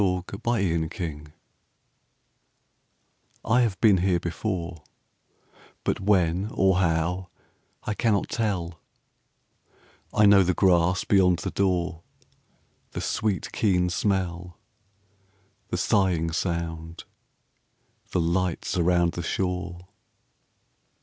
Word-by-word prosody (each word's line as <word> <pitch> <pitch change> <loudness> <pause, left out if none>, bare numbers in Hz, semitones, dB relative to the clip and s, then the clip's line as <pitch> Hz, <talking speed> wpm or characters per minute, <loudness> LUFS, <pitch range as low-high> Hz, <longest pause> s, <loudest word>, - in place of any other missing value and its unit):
Y 90 -2 +1
Z 100 - -6
Sudden 100 -9 +1
Light 80 -2 -5 2.1
I 120 +3 +3
HAVE 105 -7 0
been 105 -2 +5
here 90 -1 +1
before, 85 -1 -4 1.0
But - - -1
when 95 -1 +1
or 95 -1 +3
how 90 +1 0 0.5
I 105 - -2
cannot 105 -2 +1
tell: 90 -7 -2 1.3
I 105 - +4
know 100 -1 +7
the 90 -1 +1
grass 90 -1 +3
beyond 90 -3 +3
the - - -4
door, 90 -3 0 0.9
The - - -4
sweet, 105 -4 -2
keen 90 -4 +1
smell, 90 -3 -2 1.1
The - - -3
sighing 90 -5 +1
sound, 85 -1 -3 1.1
the 90 - 0
lights 85 +1 -1
around 85 0 +3
the 85 - -5
shore. 90 0 -3
90 Hz, 100 wpm, -25 LUFS, 85-95 Hz, 2.1 s, know